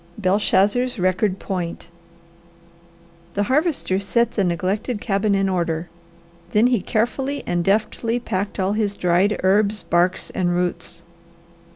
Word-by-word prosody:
BELSHAZZAR'S 210 +5 +2
RECORD 185 +1 +1
POINT 175 -3 -5 1.5
The 205 - +1
Harvester 270 - +1
set 235 +4 +1
the 200 - 0
neglected 190 +6 -1
cabin 200 -1 +1
in 195 0 +1
order; 170 -2 -1 0.6
then 210 +2 +4
he 245 -5 +2
carefully 265 +8 -1
and 175 -1 0
deftly 220 +4 0
packed 200 -4 -3
all 190 +1 +1
his 210 -2 0
dried 180 +4 +2
herbs, 205 +2 +2
barks, 175 +1 +1
and 175 -2 0
roots. 175 -1 -3
200 Hz, 125 wpm, -22 LUFS, 180-220 Hz, 1.5 s, then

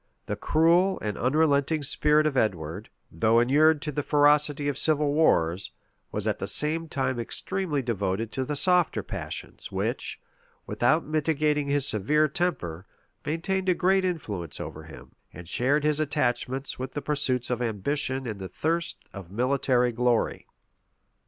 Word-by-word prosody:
The - - -3
cruel 175 +4 +3
and 105 -1 -3
unrelenting 145 +2 +1
spirit 150 +2 +3
of 150 -3 0
Edward, 85 -10 -1 0.2
though 110 +8 +3
inured 150 +5 +4
to 150 - -3
the 145 - -2
ferocity 145 0 +3
of 145 - 0
civil 150 -2 +2
wars, 95 - +2 0.4
was - - -2
at - - -1
the - - -3
same 160 +2 +1
time 130 -3 -1
extremely 155 +4 -2
devoted 105 -1 -2
to 130 - -2
the 150 +3 -3
softer 180 +2 +2
passions, - - -7
which, - - -3 0.5
without 155 +7 +1
mitigating 150 -1 0
his 140 -1 +1
severe 150 +10 +2
temper, 100 - -3 0.4
maintained 185 +5 -1
a 180 - +3
great 190 +2 +2
influence 105 - -3
over - - -7
him, - - -13 0.2
and 90 +1 -10
shared 140 - +1
his 150 0 +1
attachment 135 -2 -1
with 130 0 -5
the 145 - -3
pursuits 135 -4 -1
of 125 0 -1
ambition 130 +4 -1
and 110 -4 -5
the 95 -1 -6
thirst 165 - -2
of 95 -4 -9
military 125 +1 +1
glory. 120 0 0
140 Hz, 150 wpm, -26 LUFS, 120-155 Hz, 0.5 s, inured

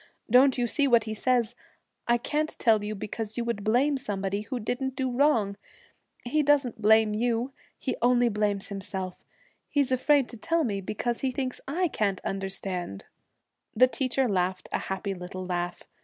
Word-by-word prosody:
Don't 260 +2 +6
you 245 - +1
see 280 +4 +2
what 235 -4 +5
he 215 0 -4
says: 240 0 +1 0.5
I 240 0 +4
can't 300 +5 -2
tell 220 -4 +3
you 210 +1 -3
because 215 +2 -5
you 235 - -1
would 235 -4 -2
blame 260 +7 +2
somebody 200 -6 -2
who 245 +4 -4
didn't 255 +4 -2
do 260 -2 -1
wrong. 230 -8 +2 0.7
He 300 +6 +2
doesn't 275 -6 +2
blame 220 0 +5
you. 235 +3 0 0.2
He 260 - -2
only 245 0 +4
blames 205 -2 -1
himself. 190 -2 -5 0.5
He's 280 -3 +1
afraid 265 +1 +3
to 235 - -9
tell 330 +9 +1
me 200 -7 -1
because 230 +5 -2
he 265 - +1
thinks 255 0 -3
I 350 +6 +1
can't 200 - -1
understand.' 190 - -4 0.7
The 250 +4 +7
teacher 260 0 0
laughed 185 -2 -1
a - - 0
happy 190 +1 -2
little 185 0 -7
laugh. 175 -1 -3
230 Hz, 170 wpm, -27 LUFS, 200-260 Hz, 0.7 s, The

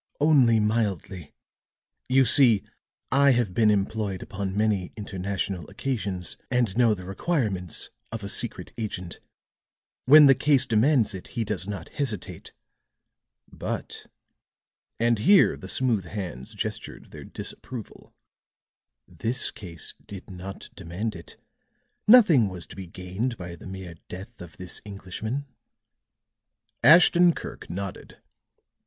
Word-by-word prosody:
"Only 135 -7 +5
mildly. 105 -6 -2 0.8
You 130 +1 +5
see, 115 -4 +5 0.5
I 140 +1 +5
have 120 -6 0
been 110 +2 +3
employed 100 -1 -1
upon 100 0 -5
many 105 -4 0
international 95 -3 -4
occasions, 100 -9 -3
and 120 -6 0
know 115 -3 +4
the 90 -2 -10
requirements 95 - -2 0.2
of 115 -2 -6
a - - -4
secret - - -2
agent. 90 -6 -5 0.9
When 150 +3 +9
the 135 - +8
case 140 0 +3
demands 115 0 +3
it, 95 - -8
he 115 - +1
does 100 -3 +1
not 100 -2 -6
hesitate. 115 -10 -4 1.0
But," - - -6 0.9
and 115 -1 +2
here 195 - +5
the - - -10
smooth 115 -8 +1
hands 85 - -7
gestured - - -6
their - - -10
disapproval, 120 -5 -8 1.0
"this 120 +4 +2
case 85 -5 -5
did 100 -1 -10
not 95 +1 -9
demand 95 +5 -5
it. 85 -2 -12 0.7
Nothing 180 - +7
was 90 -2 -4
to - - -13
be 95 -2 -8
gained 95 +8 -4
by 90 -1 -7
the 85 - -12
mere 95 -2 -8 0.2
death 95 +5 -9
of 85 -2 -11
this 90 -2 -6
Englishman." 105 +7 -5 1.4
Ashton 175 +1 +7
Kirk - - -8
nodded. 95 +1 -6
105 Hz, 125 wpm, -26 LUFS, 95-125 Hz, 1.4 s, When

